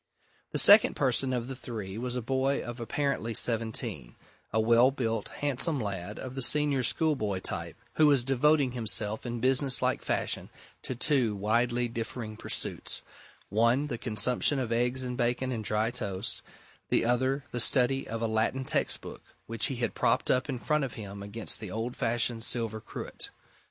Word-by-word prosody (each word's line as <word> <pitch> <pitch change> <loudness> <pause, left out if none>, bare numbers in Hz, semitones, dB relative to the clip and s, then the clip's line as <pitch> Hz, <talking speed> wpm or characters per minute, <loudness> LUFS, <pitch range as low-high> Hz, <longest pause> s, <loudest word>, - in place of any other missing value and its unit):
The - - -1
second 210 +1 +7
person 130 -1 +2
of 125 -2 -2
the 135 - -5
three 110 -6 -6
was 125 +2 -3
a 125 - -2
boy 135 +3 +1
of 120 0 -7
apparently 120 -2 -1
seventeen 110 - -1 0.4
a 110 - +1
well 115 +3 +5
built, 115 -5 -2
handsome 145 +2 0
lad 100 -2 -4
of 130 - -6
the 135 - -3
senior 145 0 +3
schoolboy 120 - +1
type, - - -5 0.2
who 155 - +6
was 140 -4 +4
devoting 135 +1 +3
himself 110 -2 0
in 120 0 -3
business 130 +2 +2
like - - 0
fashion - - -2 0.3
to 130 - -4
two 125 -4 +1
widely 120 +4 +1
differing 115 -1 -5
pursuits - - -2 0.5
one, 115 +7 +3
the 130 -5 -4
consumption 120 +5 0
of 125 -3 -2
eggs 125 +2 +1
and 125 -1 -4
bacon 125 +1 0
and 115 -3 -3
dry 105 +2 0
toast; 105 -4 -3 0.5
the - - +2
other, 130 +3 +1
the 120 - -3
study 130 +2 +3
of 115 +1 -4
a - - +2
Latin 110 +4 0
textbook, - - -1 0.2
which 115 0 0
he 135 - -3
had 120 -1 -2
propped 120 +2 +1
up 130 +2 +1
in 130 - -2
front 150 +4 0
of 130 - -4
him 100 -2 -8
against 100 +3 -2
the 105 - -6
old 115 +5 -3
fashioned 115 0 0
silver 115 -2 -2
cruet. - - -5
120 Hz, 170 wpm, -29 LUFS, 110-130 Hz, 0.5 s, second